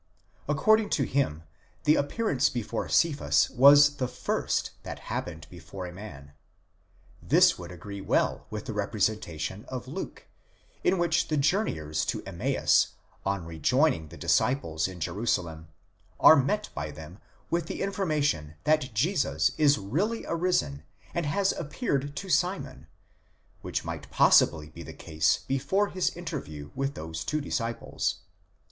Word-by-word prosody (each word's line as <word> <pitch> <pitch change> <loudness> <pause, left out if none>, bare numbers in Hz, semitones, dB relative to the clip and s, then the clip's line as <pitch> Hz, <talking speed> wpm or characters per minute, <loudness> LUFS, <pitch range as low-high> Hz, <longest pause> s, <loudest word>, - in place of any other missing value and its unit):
according 215 +8 +3
to 140 - +1
him 105 - -1 0.4
the 150 - +5
appear 190 +11 -1
ance 135 -6 +3
before 115 -3 -3
Cephas 155 -4 +3
was 145 +2 +7
the 130 - -1
first - - -2
that - - -7
happened 80 -3 -5
before 90 +2 -8
a 90 - -8
man. 75 -8 -10 0.9
This - - +4
would 85 0 -8
agree 100 +3 -8
well - - 0
with 105 -1 -6
the 110 - -4
representation 100 -3 -2
of 130 -2 -6
Luke, - - -7 0.6
in 190 - +3
which 170 -1 +1
the 155 - 0
journeyers 80 - 0
to - - -3
Em - - -9
maus, - - +2 0.3
on 100 -3 -1
rejoining 85 - +1
the 85 +3 -12
disciples 85 - +1
in 95 -1 -9
Jerusalem, 85 -4 -2 0.5
are - - +9
met 150 +10 0
by 75 0 -4
them 80 +6 -11 0.3
with 170 -1 0
the - - -3
information 150 - -1
that 150 -7 +1
Jesus 130 - +1
is 145 -2 +5
really 170 - -2
arisen 165 - 0 0.3
and 170 -3 -1
has 195 +6 +2
appeared 145 - -2
to 195 - -5
Simon, 185 +1 -1 0.7
which - - -3
might - - -6
possibly 75 -1 +4
be 80 +2 -11
the 80 - -9
case 80 +1 0
before 145 +10 +1
his 185 - 0
interview 130 - -6
with 135 +1 -2
those 80 +1 -5
two 155 - -1
disciples. 115 -5 -2
125 Hz, 140 wpm, -28 LUFS, -, 0.9 s, are